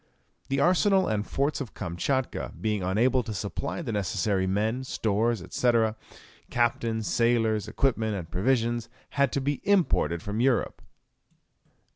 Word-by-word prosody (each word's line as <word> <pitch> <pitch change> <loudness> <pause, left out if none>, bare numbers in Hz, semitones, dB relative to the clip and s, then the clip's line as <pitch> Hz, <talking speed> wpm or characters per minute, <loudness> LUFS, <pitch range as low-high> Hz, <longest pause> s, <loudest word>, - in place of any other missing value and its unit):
The 135 +1 +1
arsenal 190 +4 +3
and 105 -1 -1
forts 140 +2 -1
of 125 - -7
Kamtchatka 125 +10 -2
being 105 -2 -1
unable 115 +8 +2
to 110 -3 -6
supply 110 - -4
the 125 - -3
necessary 100 -1 0
men, 110 +6 0
stores, 110 -3 0
&c., 125 - +2 0.8
captains, 115 -2 0
sailors, 115 -3 +1
equipment, 110 -2 0
and 90 -4 -5
provisions, 120 +5 0 0.2
had 140 -2 +2
to - - +1
be 140 +1 -1
imported 155 - +2
from 105 +1 -3
Europe. 125 -1 +1
115 Hz, 130 wpm, -27 LUFS, 105-130 Hz, 0.8 s, arsenal